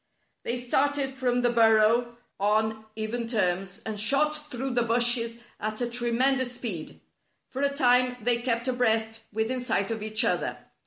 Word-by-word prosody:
They 240 - -2
started 270 +3 0
from 250 -2 0
the 240 - +3
burrow 230 +1 +4 0.2
on 220 +2 +1
even 225 +2 -3
terms, 190 -4 -1
and 215 -2 -4
shot 300 +6 +1
through 260 +1 -3
the 245 -1 +2
bushes 235 0 +1 0.2
at 215 0 -4
a 245 - 0
tremen 245 +3 +2
dous 250 -1 -2
speed. 210 -10 -5 0.5
For 265 +1 -5
a 280 - +3
time 250 -2 +3
they 235 +1 +1
kept 235 0 -1
abreast 225 -3 +1
within 220 +4 -1
sight 225 -4 0
of 220 -1 -3
each 215 0 0
other. - - 0
235 Hz, 160 wpm, -27 LUFS, 220-250 Hz, 0.5 s, burrow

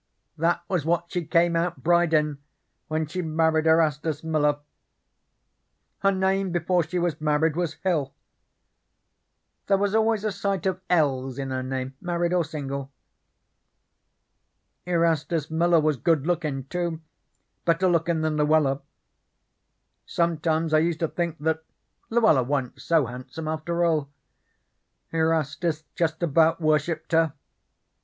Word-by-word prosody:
That 165 +2 0
was 180 -6 0
what 170 +1 -1
she 175 -3 -2
came 170 0 +3
out 165 -5 -1
bride 175 +1 +3
in 150 -2 +1 0.5
when 155 0 -1
she 180 +5 -4
married 160 -1 +1
Erastus 160 -1 +2
Miller. 150 -2 +1 1.4
Her 195 - +3
name 190 0 +1
before 175 +1 +1
she 170 +3 -4
was 170 -4 -1
married 150 +1 +2
was 170 -3 -2
Hill. 155 -8 0 1.6
There 195 - +4
was 200 0 0
always 220 -1 +2
a 215 - 0
sight 200 -2 -2
of 190 -1 -1
"l's" 135 -6 +1
in 135 -1 -4
her 130 0 -2
name, 130 0 -4
married 175 0 -1
or 180 -1 +3
single. 140 -3 -5 2.0
Erastus 165 -2 0
Miller 170 +1 +3
was 155 -2 +1
good 155 +1 +1
lookin', 155 -6 -1
too, 170 +3 -3 0.6
better 170 +2 +2
lookin' 170 -2 +1
than 155 -1 0
Luella. 150 -2 +2 1.3
Sometimes 165 -1 0
I 155 - +6
used 165 0 0
to 165 - +2
think 170 -2 -2
that 160 +2 -1 0.5
Luella 220 - +4
wa'n't 135 0 -2
so 155 +2 +2
handsome 130 +6 -7
after 170 +2 -1
all. 155 -4 +1 1.0
Erastus 160 0 0
just 160 0 -1
about 160 +1 +3
worshiped 155 0 0
her. 160 -2 +3
160 Hz, 130 wpm, -25 LUFS, 150-175 Hz, 2.0 s, I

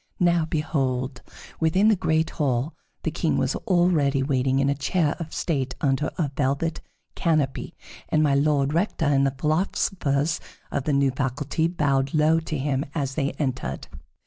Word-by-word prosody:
Now 175 -2 +3
behold! 135 -5 -1 0.4
within 185 +7 +3
the 215 - +5
great 160 -2 +1
hall 140 0 -1 0.3
the - - -1
King - - 0
was - - 0
already 165 -7 +2
waiting 135 -1 +1
in 135 0 +2
a 140 - +3
chair 145 +2 0
of 160 -2 -6
state 135 -6 -2
under 140 +2 +1
a 150 -5 0
velvet 145 +4 0 0.3
canopy, 155 -6 0 0.3
and 155 - +3
My 145 -2 +3
Lord 140 0 +2
Rector 170 -1 0
and 140 -1 +3
the 135 - -3
philosophers 155 -1 0 0.3
of 140 - -2
the 150 - +1
new 140 -1 +3
faculty 140 +4 -1
bowed 140 -4 0
low 155 +2 +4
to 160 -1 -4
him 135 0 0
as 140 -4 -1
they 140 -1 -1
entered. 125 - -3
145 Hz, 160 wpm, -25 LUFS, 135-160 Hz, 0.4 s, the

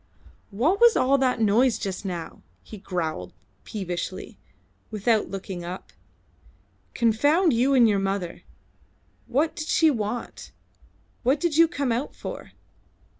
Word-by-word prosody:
"What 295 - +1
was 475 -2 +7
all 275 +2 +3
that 255 -2 +1
noise 225 +3 +3
just 195 0 -5
now?" 175 -3 -6 0.2
he 215 - -11
growled 160 - -4 0.3
peevishly, 185 -2 -5 0.5
without 215 +1 +1
looking 190 -2 -6
up. 180 +2 -8 1.0
"Confound 290 - +3
you 255 +4 +3
and 240 -3 +6
your 205 -2 +2
mother! 195 -3 -3 0.9
What 305 +6 0
did 310 -2 -5
she 320 -2 +4
want? 230 -1 -5 0.7
What 265 +4 +2
did 335 -1 0
you 330 +1 +6
come 285 -6 -2
out 245 +5 -2
for?" - - -8
230 Hz, 125 wpm, -25 LUFS, 195-280 Hz, 1.0 s, was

